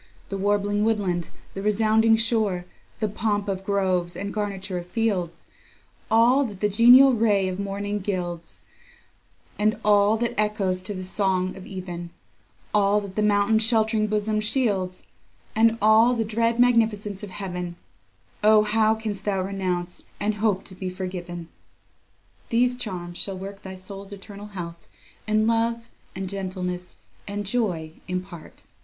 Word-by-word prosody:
The 195 - -3
warbling 205 +1 +1
woodland, 195 -6 0 0.2
the 195 - -5
resounding 220 +2 +3
shore, 220 -6 0 0.3
The 215 - +1
pomp 205 0 -1
of 195 -1 -2
groves, 185 -3 0
and 200 0 -4
garniture 195 -3 -3
of 175 - -9
fields; 185 -5 -1 0.6
All 240 +5 +5
that 205 -5 -7
the 210 - +1
genial 245 +6 +7
ray 210 -4 +2
of 185 +1 -4
morning 200 +1 -3
gilds, 175 -4 -4 1.0
And 215 +1 +2
all 205 +1 +5
that 235 +1 -1
echoes 200 -3 0
to 205 +1 -4
the 185 - -5
song 185 -1 0
of 190 - -10
even; 175 -2 -6 0.6
All 205 0 +4
that 195 -2 -9
the 215 - +1
mountain's 210 +1 +3
shelt'ring 220 -1 +2
bosom 215 0 0
shields, 205 -5 0 0.5
And 225 +1 +4
all 220 +3 +6
the 225 -1 0
dread 230 +2 +1
magnificence 220 -5 +2
of 205 - -6
heaven; 180 -3 -5 0.7
O 215 0 +6
how 220 +1 +3
canst 215 -3 -4
thou 195 -2 0
renounce, 185 -2 -3 0.2
and 210 +1 0
hope 210 -4 +1
to 190 - -10
be 185 0 -5
forgiven!..... 180 -2 -6 1.0
These 245 +2 +3
charms 180 -7 -5
shall 195 -2 -1
work 195 +1 -8
thy 190 -1 -8
soul's 195 +1 -9
eternal 200 +1 -9
health, 170 -4 -8 0.4
And 215 0 +2
love, 230 +1 0 0.3
and 190 +1 -4
gentleness, 185 -2 -4 0.3
and 205 0 -4
joy, 185 -8 -1 0.2
impart. 180 -2 -7
205 Hz, 145 wpm, -25 LUFS, 185-220 Hz, 1.0 s, genial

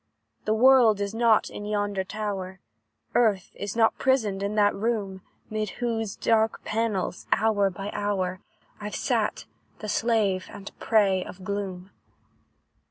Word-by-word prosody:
"The 215 - +2
world 240 -3 +6
is 200 +1 -2
not 225 -1 +3
in - - -7
yonder 205 -2 -1
tower, 190 -2 -4 0.5
Earth 210 -6 +2
is 205 +1 -5
not 225 -1 +3
prisoned 220 -8 +1
in 200 +1 -2
that 205 -1 +4
room, 200 -3 -2 0.3
'Mid 215 -1 -2
whose 225 -4 -2
dark 220 -1 +1
panels, 215 -5 -2
hour 210 -3 +3
by 195 +3 -6
hour, 190 -3 -1 0.4
I've 210 0 -5
sat, - - -1 0.3
the 215 - -7
slave 210 -4 +1
and 200 - -9
prey 195 -4 +3
of 185 +1 -11
gloom. 195 -1 -4
205 Hz, 135 wpm, -26 LUFS, 195-220 Hz, 0.5 s, world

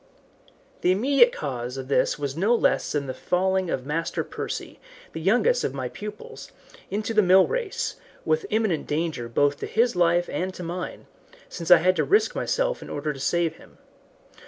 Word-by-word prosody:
The 180 - +3
immediate 240 +5 +4
cause 125 -3 -5
of 130 -1 -6
this 140 - +1
was 140 -2 -4
no 205 +8 +2
less - - +1
than 145 -2 -1
the 130 - -4
falling 190 +2 0
of 130 - -2
Master 165 +3 -2
Percy, - - -6 0.3
the 160 - -5
youngest 245 - +2
of - - -2
my - - -3
pupils, 210 0 -9 0.4
into 210 +3 -2
the 215 - +5
mill 190 0 +6
race, 470 -5 -3 0.3
with 465 -3 0
imminent 215 -8 0
danger 150 -6 -2
both 145 +4 +1
to - - -4
his 230 -1 +1
life 175 0 +3
and 185 +1 -3
to 180 - -7
mine, 175 +2 -5 0.4
since 170 -1 -6
I 180 - +10
had 185 +3 +2
to - - +2
risk 415 +3 +3
myself - - -1
in - - -9
order 150 +1 -3
to 135 - -11
save 165 +3 0
him. - - -18
180 Hz, 180 wpm, -25 LUFS, 150-215 Hz, 0.4 s, I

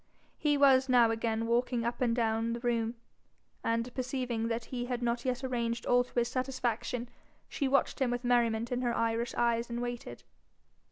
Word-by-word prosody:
He 295 -1 +2
was 270 -2 +5
now 240 -3 +5
again 225 0 -1
walking 235 0 +1
up 235 +2 -3
and 235 -2 +2
down 225 -1 0
the 235 - -4
room, 235 -1 0 0.7
and, 230 +2 -1
perceiving 250 -3 -2
that 230 0 -2
he 245 -1 -2
had 245 -1 -3
not 235 +1 -1
yet 255 +1 -1
arranged 235 -2 -2
all 245 0 +4
to 245 - -20
his 235 0 +3
satisfaction, 250 -1 -2 0.4
she 280 - -1
watched 275 +1 +1
him 260 - +3
with 245 +1 -2
merriment 235 -1 +2
in 250 0 0
her 240 -2 0
Irish 230 +2 0
eyes, 235 0 +1
and 235 0 -3
waited. 240 - -5
240 Hz, 180 wpm, -31 LUFS, 230-250 Hz, 0.7 s, was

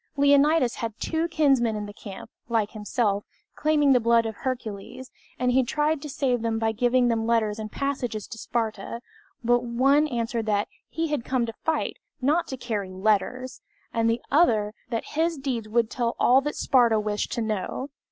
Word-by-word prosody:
Leonidas 285 -1 +4
had 225 -2 -4
two 325 +1 -1
kinsmen 270 -9 +2
in 210 0 -3
the 205 - -9
camp, 200 -2 -10 0.2
like 225 -3 +1
himself, 210 -1 -1 0.3
claiming 295 -2 +3
the 250 - +5
blood 230 0 +3
of 220 -2 -4
Hercules, 250 0 -5 0.3
and 250 0 +1
he 260 +1 +4
tried 300 +4 0
to 300 - -6
save 255 -3 0
them 225 -1 0
by 225 0 +1
giving 245 +2 +2
them 225 -1 0
letters 220 -2 +1
and 215 0 -5
messages 255 -7 -2
to 225 - -8
Sparta; 225 -1 -3 0.4
but 240 +1 +3
one 270 +5 +3
answered 230 -3 -2
that 205 -1 +1 0.2
"he 330 0 -2
had 295 -5 -1
come 255 -1 0
to 230 - -6
fight, 320 +6 -2 0.2
not 300 +6 +1
to 265 - -5
carry 215 -6 -3
letters;" 215 +7 -1 0.3
and 230 0 +2
the 230 +1 -1
other, 220 -10 +3 0.2
that 230 -2 -2
"his 325 +1 +1
deeds 250 -6 -3
would 230 +1 +1
tell 235 -2 -1
all 260 +2 +5
that 295 +2 -3
Sparta 235 -4 +3
wished 210 0 -2
to 235 - -1
know." 215 +5 -3
235 Hz, 180 wpm, -26 LUFS, 220-270 Hz, 0.4 s, the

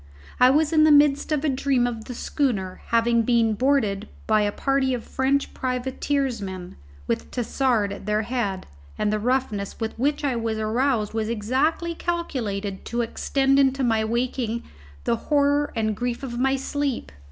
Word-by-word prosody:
I 250 - +7
was 305 +3 +2
in 310 -1 +5
the 310 - +6
midst 290 0 +4
of 305 0 +1
a - - +3
dream 265 -2 +1
of 230 -2 -4
the 250 - -7
schooner 210 -11 -1
having 230 0 +3
been 230 -1 +2
boarded 220 -5 +1 0.2
by 215 -1 +3
a 205 0 +1
party 270 +2 +1
of 235 - -6
French 270 +2 0
privateersmen, 250 -7 -2 0.3
with 115 - -2
Tassard 240 -3 0
at 200 0 -10
their 210 +1 +1
head, 210 -5 -2 0.3
and 210 - 0
the 215 - 0
roughness 225 -4 -1
with 225 -1 -2
which 290 +4 0
I 275 -4 +1
was 225 -1 -2
aroused 220 0 0
was 220 -1 -1
exactly 265 +10 0
calculated 225 - -3
to 240 0 -1
extend 270 +4 +1
into 270 -1 +3
my 225 -3 +2
waking 235 0 -1 0.4
the 235 - +1
horror 285 +2 +1
and 215 -2 0
grief 245 +3 -3
of 240 -2 -4
my 270 +1 +2
sleep. 270 - -2
245 Hz, 165 wpm, -24 LUFS, 220-275 Hz, 0.4 s, I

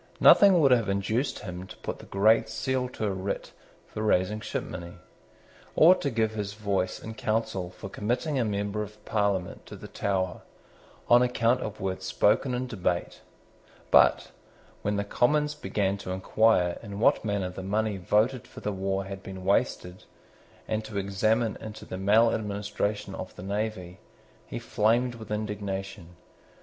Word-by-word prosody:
Nothing 195 -3 +7
would 140 -4 +5
have 115 -5 +3
induced 105 +7 0
him 90 0 -6
to - - -11
put - - -6
the - - -12
great 110 +3 +3
seal 130 -1 -1
to 110 - -4
a 100 - 0
writ 95 +1 -4 0.3
for 110 - -7
raising 105 0 +1
shipmoney, 85 -4 -5 0.8
or 165 +4 +8
to 165 -6 -2
give 110 -3 0
his 105 -2 -4
voice 100 -3 -1
in 110 - -7
Council 110 -5 -2
for 90 - -9
committing 125 +9 -1
a - - +2
member 105 0 -2
of 105 0 -9
Parliament 100 -4 -1
to - - -9
the - - -10
Tower, 95 -3 -2 0.7
on 120 +1 +7
account 125 0 +2
of 110 0 -5
words 95 -1 -3
spoken 130 -2 +2
in 125 +1 -2
debate: 95 -7 -2 0.7
but, - - +5 0.5
when 105 0 -1
the 100 - 0
Commons 150 +8 +1
began 100 -9 -1
to 95 - -7
inquire 95 -1 +2
in 100 -3 -7
what - - +3
manner 100 -4 -1
the 95 - -7
money 105 +2 -1
voted 110 +7 +1
for - - -11
the 105 - -2
war 95 0 -2
had 95 0 -7
been 95 -1 -8
wasted, 95 -2 0 0.6
and 110 0 -1
to 110 -1 -7
examine 110 +3 +1
into 110 -1 -8
the 95 - -6
maladministration 105 0 +1
of - - -7
the - - -9
navy, 100 -2 -3 0.5
he - - -5
flamed 120 +4 +1
with 110 -2 -10
indignation. 100 -4 -4
105 Hz, 160 wpm, -27 LUFS, 95-115 Hz, 0.8 s, or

